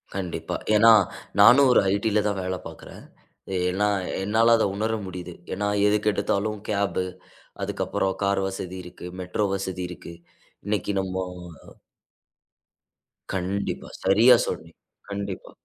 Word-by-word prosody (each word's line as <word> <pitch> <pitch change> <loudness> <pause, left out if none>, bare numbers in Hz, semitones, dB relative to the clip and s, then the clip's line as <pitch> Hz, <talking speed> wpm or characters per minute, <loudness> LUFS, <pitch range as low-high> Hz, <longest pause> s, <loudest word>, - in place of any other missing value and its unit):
கண்டிப்பா. 90 -3 -4 0.2
ஏன்னா, 115 +2 +7 0.5
நானும் 135 +2 +8
ஒரு - - +6
ஐ.டில 105 +1 +1
தான் 100 -1 -1
வேல 95 0 -2
பாக்கறேன். - - -12 0.7
ஏன்னா 100 +3 +1 0.4
என்னால 115 +3 +4
அத - - +2
உணர 110 +2 -1
முடியுது. 90 -1 -7 0.2
ஏன்னா, 105 +2 -1 0.2
எதுக்கு 105 0 +2
எடுத்தாலும் 105 +1 -1
கேப்ஹு 100 -3 0 0.6
அதுக்கப்புறம் 95 -1 -1
கார் 100 0 +1
வசதி 95 -1 -6
இருக்கு, 90 0 -11 0.2
மெட்ரோ 90 +3 -1
வசதி 95 -1 -4
இருக்கு. 85 -1 -9 0.5
இன்னைக்கு 105 0 -1
நம்மோ 95 0 -3 2.1
கண்டிப்பா. 95 +2 -3
சரியா 110 +6 +6
சொன்னீங் - - -6 0.3
கண்டிப்பா, 100 -1 -5
100 Hz, 115 wpm, -25 LUFS, 95-105 Hz, 2.1 s, நானும்